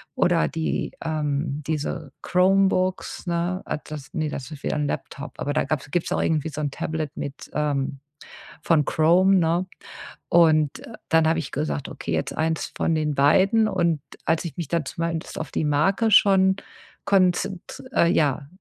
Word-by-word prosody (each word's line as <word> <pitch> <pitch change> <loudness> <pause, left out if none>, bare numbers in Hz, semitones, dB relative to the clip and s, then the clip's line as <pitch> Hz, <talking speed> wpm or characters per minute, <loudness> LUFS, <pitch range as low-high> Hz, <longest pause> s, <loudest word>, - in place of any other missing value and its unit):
oder 175 -1 +3
die, 160 -1 -2
ähm, 150 -2 -2
diese 155 -2 -3
Chromebooks, 185 0 +2
ne 175 +2 -1
ah, - - -2
das, 150 -2 -9
ne, 155 -2 -1
das 135 0 -6
ist 145 - -9
wieder - - -1
'n 150 -1 0
Laptop. 140 0 -6
Aber 145 - -2
da 155 - +1
gab's 145 -2 -3
gibt's 175 +1 -1
auch - - +1
irgendwie 160 -1 0
so 150 0 -5
'n 145 - -1
Tablet 155 0 -3
mit 140 0 -6
ähm, 140 -2 -1 0.6
von 160 -3 +3
Chrome, 180 +6 +4
ne? 170 +2 +1 0.6
Und 155 -4 +4 0.3
dann 160 -1 +4
habe 160 +1 +2
ich 150 - -5
gesagt: 145 -1 -3
„Okay, - - -6
jetzt 80 0 -2
1 160 0 -1
von 165 - 0
den 150 -2 0
beiden.” 190 +10 +4
Und 170 -7 0 0.2
als 165 +1 +1
ich 170 - -6
mich 170 -5 -3
dann 170 -2 -1
zumindest 165 +2 -4
auf 155 - -5
die 155 - -1
Marke 190 +10 +2
schon 190 -1 +5 0.5
konzent 185 -1 +1
äh, 170 - +4
ja, 145 -4 +1
160 Hz, 170 wpm, -24 LUFS, 150-180 Hz, 0.6 s, schon